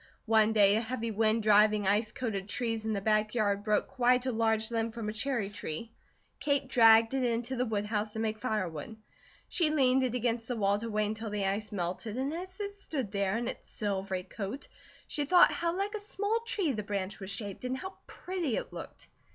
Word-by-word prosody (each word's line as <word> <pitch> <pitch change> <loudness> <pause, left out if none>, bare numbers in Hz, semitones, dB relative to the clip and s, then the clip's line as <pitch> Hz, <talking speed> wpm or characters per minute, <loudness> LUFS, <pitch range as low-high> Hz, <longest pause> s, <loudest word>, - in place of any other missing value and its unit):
One 220 -1 +4
day 205 -2 +5
a - - +1
heavy 230 -1 -3
wind 220 +1 +2
driving 210 0 +5
ice 210 +3 +2
coated 205 -6 -4
trees 225 -1 -2
in 220 - 0
the 200 - -2
back 215 +1 +1
yard 205 -3 +1
broke 210 -1 +2
quite 250 0 +2
a 260 - +1
large 220 -1 +1
limb 225 0 0
from 225 -2 -4
a - - -4
cherry 235 -2 -1
tree. 205 +2 -5 0.5
Kate 280 -1 0
dragged 225 -2 +6
it 265 -1 +1
into 240 +1 -1
the 250 0 0
woodhouse 210 0 -1
to 220 - -4
make 220 -1 -1
firewood. 205 -1 -3 0.5
She 335 -4 +2
leaned 265 -3 +3
it 250 -1 -1
against 235 -1 -1
the 245 - -2
wall 200 -2 +2
to 230 +1 -5
wait 215 -1 +1
until 220 +1 -3
the 205 -1 -1
ice 205 +3 -1
melted, 200 +4 -3
and 270 +3 -1
as 370 +3 -6
it 405 -1 -3
stood 290 - -4
there 200 0 0
in 240 - -2
its - - -6
silvery 195 -3 -2
coat, 205 +7 -6 0.4
she 295 - -1
thought 355 +4 +6
how 340 +1 -1
like 400 +2 -1
a 430 - -3
small 415 +2 -1
tree 395 -10 0
the 215 -5 -2
branch 200 -1 -4
was 190 -1 -7
shaped, 200 0 -5
and 255 +1 -2
how 375 +7 -6
pretty 355 -10 -3
it - - -5
looked. - - -9
225 Hz, 210 wpm, -30 LUFS, 210-255 Hz, 0.5 s, dragged